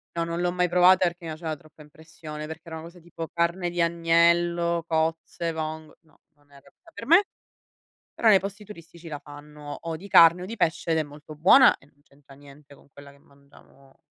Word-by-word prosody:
No, 170 0 -1
non 170 +1 -4
l'ho 175 0 0
mai 180 0 0
provata 180 +1 +4
perché 175 +1 -7
mi 165 - -6
faceva 155 0 -5
troppa 155 +1 -20
impressione, 155 0 -11
perché 160 +1 -9
era 165 -1 -8
una 160 - -8
cosa 170 +1 -14
tipo 165 -1 -9
carne 170 +1 -1
di 175 0 -2
agnello, 170 0 +1
cozze, 165 +1 -2
vong 155 0 -6
no, 155 - -30 0.2
non 145 -1 -32
era 140 -1 -19
p - - -38 0.2
per - - -9
me, 340 +7 +5 0.9
però 230 - -1
nei 205 -3 +7
posti 200 +2 -7
turistici 170 -4 -14
la 150 -2 -6
fanno 145 0 -11
o 165 -1 -5
di 190 +5 -11
carne 170 0 +6
o - - -6
di 230 +4 -8
pesce 165 -2 -1
ed 160 - +2
è 160 - +1
molto 150 +1 -13
buona 190 - +6
e - - -24
non 145 0 -30
c'entra 140 -1 -21
niente 140 0 -17
con 140 - -23
quella 140 0 -14
che 140 - -22
mangiamo 140 -1 -23
165 Hz, 210 wpm, -25 LUFS, 150-175 Hz, 0.9 s, nei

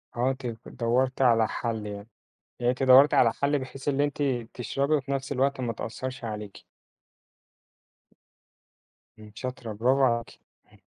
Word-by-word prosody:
آه، 125 +2 +1
أنتِ 130 -1 -6 0.2
دوّرتِ 125 +3 0
على 115 -3 +4
حَل 115 -3 -3
يعني. 100 +1 -7 0.5
يعني 120 0 +2
أنتِ 130 +1 -3
دوّرتِ 130 +3 +7
على 115 -2 +5
حَل 140 +3 0
بحيث 130 +1 -7
اللي 145 0 +2
أنتِ 145 0 -2 0.3
تشربي 140 +4 -1
وفي 140 -1 -1
نَفْس 135 0 -2
الوقت 135 0 0
ما 120 -2 -1
تأثّرش 125 +3 -6
عليكِ. 105 -2 -7 2.6
إمم، 105 -1 -13
شاطرة، 125 -3 -6
برافو 130 +6 +2
عليكِ. 120 -2 0 0.3
همم. - - -23
130 Hz, 145 wpm, -27 LUFS, 115-135 Hz, 2.6 s, دوّرتِ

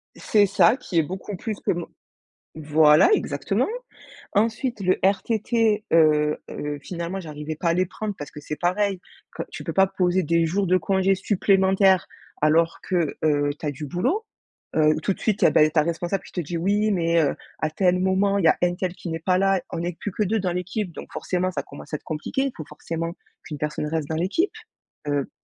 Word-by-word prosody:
C'est 210 -2 +3
ça 200 +4 +4
qui 195 -9 -4
est 160 - +5
beaucoup 190 +5 -6
plus 215 +4 -4
que - - +3
mon 175 -1 -3 0.7
voilà 155 - +5
exactement. - - 0 0.7
Ensuite 225 +2 0
le 185 0 +2
RTT, 215 +2 +1
heu 150 -2 +4
heu, 145 0 -5
finalement 170 +3 -5
j'arrivais 155 -2 -6
pas 170 +2 -1
à 165 - +3
les 185 +1 +2
prendre 210 +3 -5
parce 145 - -8
que - - -9
c'est 150 - -5
pareil 190 +3 0 0.4
que, - - -3
tu - - -7
peux - - -4
pas 195 - +5
poser 185 -1 +1
des 170 +2 +2
jours 195 +4 0
de 185 - +4
congés 190 +2 +2
supplémentaires 190 -1 +3 0.3
alors 165 +2 +3
que, 175 -5 0
heu, 145 -2 +2
tu 160 - -6
as 145 - 0
du 150 +2 -7
boulot. 260 - -1 0.5
Heu, 155 -1 +4
tout 195 - +1
de - - -16
suite 215 -2 0
et - - +6
beh, 155 0 +5
ta 155 -2 +3
responsable 170 +3 -2
qui - - -14
te 175 - -1
dit: 170 +2 -4
«Oui 205 +5 +1
mais 170 -3 +2
heu, 145 - +1 0.2
à 155 - 0
tel 180 +3 +2
moment 190 +2 +2
il 175 - 0
y - - +7
a - - +4
un 175 0 +3
tel 180 0 -2
qui 175 - -8
n'est 165 - -3
pas 180 +3 +1
là, 195 -1 +2
on 165 - -3
est 175 -1 -4
plus 205 - -4
que 210 - -1
2 220 +3 0
dans 185 -2 -1
l'équipe 180 +2 -3
donc - - -9
forcément 185 0 -1
ça - - -2
commence - - -12
à - - +1
être - - -26
compliqué, 155 - -3
il 275 - -1
faut 155 - -7
forcément 165 +2 -5 0.3
qu'une 150 - -7
personne 150 0 -2
reste 155 -2 -2
dans 160 - -1
l'équipe». 190 - 0 0.6
Heu, 145 -2 -1
180 Hz, 215 wpm, -24 LUFS, 160-195 Hz, 0.7 s, y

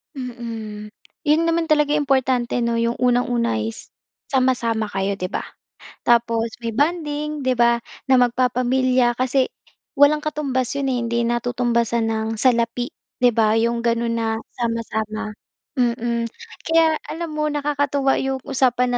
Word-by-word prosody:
Mm. 230 -5 -6 0.4
Yun 300 +2 +5
naman 330 0 +1
talaga 300 -2 +3
yung 295 -1 +1
importante 255 -3 +1
'no, 235 0 0
'yong 230 +1 +1
unang-una 245 - +2
is 110 +1 -6 0.4
sama-sama 240 -5 +1
kayo, 195 0 -2
'di 185 - -2
ba? - - -3 0.6
Tapos 230 -1 +2
may 230 -2 -4
bonding, 300 0 -1
'di 255 - +3
ba, 235 0 +3 0.3
na 260 - +6
magpapamilya 250 0 +2
kasi, 255 +2 +1 0.5
walang 285 +2 +5
katumbas 275 -4 -1
'yon 275 -1 -1
hindi 235 -1 0
natutumbasan 235 -1 0
ng 220 0 -1
salapi, 235 +1 +1 0.3
'di 245 - +6
ba? 220 -2 +2
'Yong 235 +1 +1
gano'n 235 0 +1
na 230 -1 -1 0.3
sama-sama, 220 -2 -2 0.5
mm. 235 -1 0 0.4
Kaya 325 -1 +4
alam 335 0 -5
mo 305 0 -1
nakakatuwa 285 -2 +1
'yong 265 -1 -2
usapan 250 -2 +1
245 Hz, 135 wpm, -21 LUFS, 230-270 Hz, 0.6 s, na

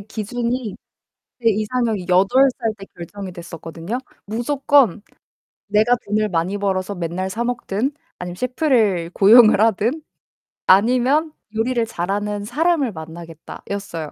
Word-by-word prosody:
기준이 235 +2 -3 0.7
제 230 - +4
이상형이 215 -2 -1
8 195 +10 +4
살 225 -2 -1
때 195 - -10
결정이 185 +2 -8
됐었거든요. 170 +4 -6 0.3
무조건 240 0 +2 0.7
'내가 215 +4 +3
돈을 215 +1 0
많이 180 +3 -1
벌어서 195 0 -2
맨날 175 +2 -3
사 225 +5 -3
먹든, 240 0 -2 0.3
아니면 180 0 -6
셰프를 230 - +1
고용을 215 +1 +7
하든, 225 - +1 0.7
아니면 255 - +3 0.2
요리를 235 +2 0
잘하는 205 +2 -3
사람을 295 +1 +1
만나겠다.'였어요. 165 +1 -8
210 Hz, 275 characters per minute, -20 LUFS, 185-245 Hz, 0.7 s, 고용을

